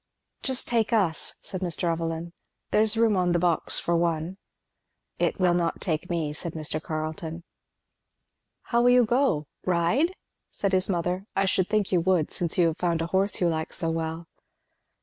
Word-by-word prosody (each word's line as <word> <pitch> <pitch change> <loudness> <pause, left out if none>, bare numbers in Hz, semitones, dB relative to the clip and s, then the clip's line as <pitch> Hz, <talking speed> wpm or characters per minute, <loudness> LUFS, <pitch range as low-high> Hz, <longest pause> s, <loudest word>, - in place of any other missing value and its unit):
"Just 260 -2 0
take 230 -2 +1
us," 185 -8 +1
said 185 - -5
Mr. 175 -3 -2
Evelyn. 165 +1 -3 0.4
"There's 215 +1 +3
room 225 -2 +4
on 180 -2 +2
the - - +3
box 170 -1 +1
for 170 - +1
one." 170 +1 0 0.8
"It - - 0
will 180 -2 +4
not 175 -1 0
take 165 0 -2
me," 160 -4 -1
said 165 +2 -4
Mr. 155 -1 -3
Carleton. 160 +1 -4 1.2
"How 235 0 +1
will 245 - +5
you 245 -1 +6
go? 240 - +2 0.2
ride?" 185 - +1 0.3
said 200 - -1
his 185 0 +2
mother 180 +2 -1
"I 195 - +2
should 190 -1 +1
think 210 -2 +1
you 180 -3 +3
would, 175 -3 +1
since 170 -2 -1
you 175 - +5
have 160 - -5
found 170 -2 0
a 170 - -7
horse 195 +1 +2
you 175 - +3
like 160 -1 -2
so 165 -2 -1
well." 160 +1 -3
175 Hz, 175 wpm, -26 LUFS, 165-195 Hz, 1.2 s, you